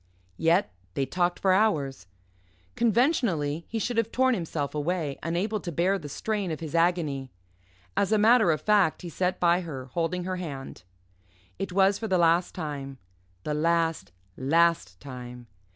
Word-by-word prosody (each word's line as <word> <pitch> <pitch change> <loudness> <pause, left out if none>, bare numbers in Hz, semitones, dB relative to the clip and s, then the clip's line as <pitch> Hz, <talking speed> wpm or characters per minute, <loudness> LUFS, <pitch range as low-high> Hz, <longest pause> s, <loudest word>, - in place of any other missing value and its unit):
Yet 165 - +2 0.2
they 135 - 0
talked 175 +5 0
for 190 - +2
hours. 145 - +1 0.7
Conventionally 215 - +1
he 230 - -3
should 235 +2 -2
have 230 -1 +1
torn 260 0 +3
himself 165 - -3
away, 150 -1 -2
unable 190 +6 -1
to 175 - -5
bear 185 +5 +1
the 150 - -8
strain 205 +4 -2
of 155 - -4
his 160 -2 -7
agony. 165 -6 +1 0.7
As 200 0 +1
a 215 - +4
matter 220 -1 +5
of 155 -2 +1
fact, 205 -7 +3
he 175 - -5
sat 180 +3 -1
by 175 +1 +3
her 135 -7 -7
holding 175 +1 -1
her 185 +1 -3
hand. 140 - -7 0.8
It 195 - -3
was 195 +1 +3
for 225 - -3
the 190 -3 +2
last 170 +1 +3
time 140 -5 -5 0.5
the 150 - -2
last, 165 - 0 0.2
last 150 - +2
time. 125 -2 -9
170 Hz, 160 wpm, -27 LUFS, 145-195 Hz, 0.8 s, matter